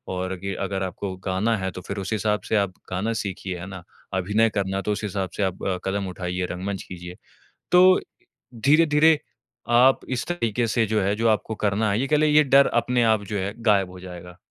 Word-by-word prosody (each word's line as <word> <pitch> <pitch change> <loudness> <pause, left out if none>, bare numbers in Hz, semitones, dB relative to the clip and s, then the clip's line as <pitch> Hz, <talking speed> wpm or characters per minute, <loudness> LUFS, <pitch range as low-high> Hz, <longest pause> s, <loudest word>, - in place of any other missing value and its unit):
और 95 +1 -3
अगे 95 +1 -4
अगर 95 -1 -3
आपको 95 +1 -4
गाना 100 +5 +1
है, 95 -1 -2
तो 90 - -8
फिर 100 - -6
उस 100 +3 -3
हिसाब 105 0 0
से - - +1
आप 100 -2 0 0.2
गाना 100 +5 -1
सीखिए, 95 -2 -5
है 85 - -7
ना, 95 -3 -9 0.3
अभिनय 105 +4 +2
करना 95 0 -1
तो 105 - -2
उस 105 - -3
हिसाब 95 -2 -2
से - - 0
आप 95 -1 -3
अ, 95 -1 0
कदम 95 0 -1
उठाइए, 90 0 -3
रंगमंच 95 +2 -4
कीजिए। 90 0 -9 0.6
तो 185 +1 +7
इ - - -17 0.5
धीरे-धीरे 150 +5 +4 0.5
आप 125 +3 +5
इस 125 -2 -2
तरीके 120 -9 -1
से 115 0 +1
जो 110 0 0
है 100 +2 +1
जो 115 +1 +1
आपको 110 0 0
करना 105 +1 0
है 100 +3 +1
ये 135 - 0
कह 150 - +2
लें, 155 +1 +3
ये 150 0 +6
डर 140 0 +5
अपने 120 +1 +1
आप 110 -2 +3
जो 105 +1 -4
है 100 +1 -2
गायब 100 -4 +3
हो 90 0 -11
जाएगा। 90 -1 -10
100 Hz, 220 wpm, -24 LUFS, 95-115 Hz, 0.6 s, तो